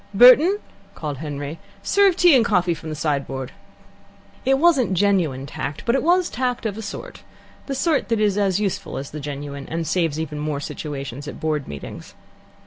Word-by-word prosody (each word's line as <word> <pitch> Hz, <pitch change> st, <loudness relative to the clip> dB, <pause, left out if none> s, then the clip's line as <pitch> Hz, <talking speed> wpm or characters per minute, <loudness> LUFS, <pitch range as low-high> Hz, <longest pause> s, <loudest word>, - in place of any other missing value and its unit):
"Burton," 260 Hz, -, +8 dB, 0.4 s
called 145 Hz, -4 st, -5 dB
Henry, 145 Hz, 0 st, -5 dB, 0.2 s
"serve 400 Hz, -3 st, +4 dB
tea 350 Hz, -4 st, +6 dB
and 245 Hz, -, +5 dB
coffee 180 Hz, -5 st, +2 dB
from 160 Hz, 0 st, -8 dB
the 155 Hz, -, -4 dB
side 145 Hz, -2 st, -1 dB
board!" 135 Hz, -1 st, -5 dB, 0.9 s
It 270 Hz, +1 st, +4 dB
wasn't 275 Hz, -, +3 dB
genuine 175 Hz, -9 st, +1 dB
tact, 140 Hz, 0 st, -5 dB
but 235 Hz, -, +2 dB
it 270 Hz, -, +2 dB
was 350 Hz, +2 st, +3 dB
tact, 250 Hz, -2 st, -2 dB
of 210 Hz, -3 st, -1 dB
a 220 Hz, -, -6 dB
sort -, -, -7 dB, 0.5 s
the 275 Hz, -, -2 dB
sort 300 Hz, 0 st, +1 dB
that 230 Hz, -2 st, +1 dB
is 210 Hz, -2 st, +2 dB
as 200 Hz, -2 st, +1 dB
useful 200 Hz, -1 st, -2 dB
as 135 Hz, -, -6 dB
the 150 Hz, -, -6 dB
genuine, 140 Hz, -1 st, -6 dB
and 165 Hz, 0 st, -2 dB
saves 165 Hz, -3 st, 0 dB
even 150 Hz, -2 st, -4 dB
more 150 Hz, -1 st, -2 dB
situations 140 Hz, -2 st, -6 dB
at -, -, -7 dB
Board 155 Hz, -3 st, -1 dB
meetings. 70 Hz, -1 st, -9 dB
170 Hz, 185 wpm, -22 LUFS, -, 0.9 s, Burton